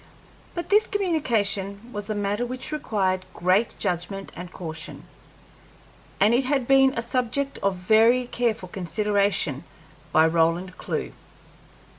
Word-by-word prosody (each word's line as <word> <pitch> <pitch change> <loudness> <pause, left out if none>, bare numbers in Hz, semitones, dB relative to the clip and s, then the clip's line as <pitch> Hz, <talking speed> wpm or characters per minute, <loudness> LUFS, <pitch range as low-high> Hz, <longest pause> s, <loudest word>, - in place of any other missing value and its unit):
But 345 - -4
this 420 +2 +4
communication 230 - -1
was 205 0 -5
a 215 - -1
matter 205 +2 -1
which 255 +4 -5
required 195 -10 0
great 185 +6 +2
judgment 195 +1 -3
and 180 0 -8
caution, 160 -3 -7 1.2
and 210 +4 +5
it 255 +2 +2
had 265 -2 0
been 270 -1 +5
a 230 - 0
subject 255 +3 -1
of 195 -1 0
very 225 +7 +4
careful 230 -6 -1
consideration 200 -5 0 0.5
by 160 0 +5
Roland 165 +3 +1
Clewe. - - -4
205 Hz, 125 wpm, -25 LUFS, 185-245 Hz, 1.2 s, and